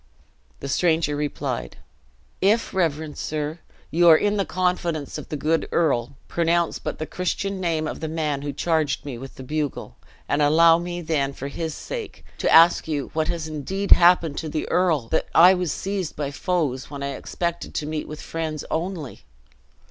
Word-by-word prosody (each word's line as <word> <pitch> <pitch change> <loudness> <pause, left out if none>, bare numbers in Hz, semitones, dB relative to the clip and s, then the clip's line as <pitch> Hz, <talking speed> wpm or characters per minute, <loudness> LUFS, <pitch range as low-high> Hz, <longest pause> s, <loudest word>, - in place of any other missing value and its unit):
The - - -4
stranger 160 0 +1
replied: 145 - -3 0.6
"If, 215 +4 +2
reverend 160 -4 -1
sir, 155 +2 -3 0.3
you 170 +2 +5
are 160 - +9
in 205 +3 +1
the 195 - 0
confidence 175 -5 -1
of - - -10
the 150 - -3
good 160 +3 0
earl, 135 -6 +1
pronounce 170 0 +1
but - - -4
the 155 - -3
Christian 190 +3 -2
name 160 -3 0
of - - -5
the 160 - -3
man 155 -3 -2
who 145 0 -3
charged 155 0 0
me 130 -5 -6
with 135 +1 -9
the 130 - -9
bugle, 150 +1 -3 0.3
and 145 - +1
allow 165 +3 +6
me, 175 0 -4
then, 150 -4 -1
for 140 +1 -6
his 160 +1 -4
sake, 470 -4 -7
to - - +1
ask 165 0 +6
you 145 -4 -3
what 155 0 0
has 165 -2 -3
indeed 185 +7 -4
happened 170 -4 +6
to 160 - -4
the 155 0 -3
earl! 165 -9 +2
that - - 0
I 180 +3 +8
was 180 -3 -1
seized 195 -4 -3
by 145 -2 -3
foes, 145 -5 -1
when 140 -1 -6
I 140 - -2
expected 170 +5 -4
to 150 - -1
meet 155 0 -4
with 155 0 -8
friends 160 -2 -4
only! 165 - -3
160 Hz, 180 wpm, -23 LUFS, 145-175 Hz, 0.6 s, are